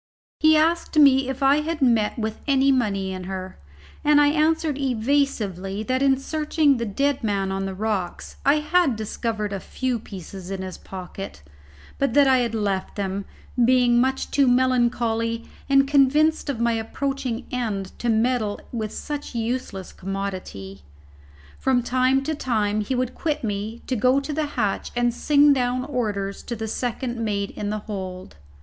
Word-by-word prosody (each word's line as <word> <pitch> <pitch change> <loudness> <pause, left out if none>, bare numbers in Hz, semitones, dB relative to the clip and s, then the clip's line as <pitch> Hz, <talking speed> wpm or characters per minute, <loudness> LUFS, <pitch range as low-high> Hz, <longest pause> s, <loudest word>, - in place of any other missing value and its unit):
He 310 0 +6
asked 330 +1 +1
me 270 -3 +6
if 265 +1 -3
I 275 +2 +5
had 310 +1 -2
met 230 -6 +2
with 220 -1 -3
any 275 -1 +4
money 200 -7 0
in 185 -1 -6
her: 185 - -6 0.4
and 295 0 +5
I 290 0 +5
answered 310 0 +1
evasively 220 -7 0
that 255 +3 0
in 270 -1 +4
searching 300 0 +1
the 235 -1 -2
dead 275 +7 0
man 200 -3 0
on 195 0 -2
the 190 - -5
rocks, 200 -3 -3
I 280 +2 +5
had 305 -3 +2
discovered 215 -1 -3
a 195 - -3
few 255 +4 -2
pieces 190 -2 -9
in 195 -1 -4
his 185 -1 -7
pocket, 185 - -8 0.6
but 275 -4 0
that 285 -1 +7
I 265 -1 +5
had 235 -2 -1
left 200 -3 -2
them, 195 -1 -3 0.4
being 245 -1 +4
much 265 +1 -1
too 280 -2 +3
melancholy 240 -2 +1 0.2
and 275 0 +5
convinced 295 +3 +3
of 265 -5 -2
my 235 0 +2
approaching 250 +2 -3
end 210 -6 -2
to 240 - -1
meddle 225 -2 +1
with 220 -3 -3
such 295 -4 -6
a - - -1
useless 225 -4 -3
commodity. 185 - -5 0.8
From 255 -2 +2
time 255 +2 +2
to 315 - -1
time 215 -7 0
he 235 +5 -2
would 255 0 -1
quit 305 -4 -2
me 215 +2 -4
to 260 - -1
go 255 +4 +3
to 290 +2 -5
the 305 0 -1
hatch 210 -4 0
and 240 0 +2
sing 290 +3 +4
down 255 -1 0
orders 205 -8 -2
to 240 - -4
the 220 0 -4
second 240 +1 -3
mate 200 -2 -1
in 205 - -4
the 215 - -1
hold. 185 - -6
240 Hz, 170 wpm, -23 LUFS, 205-275 Hz, 0.8 s, that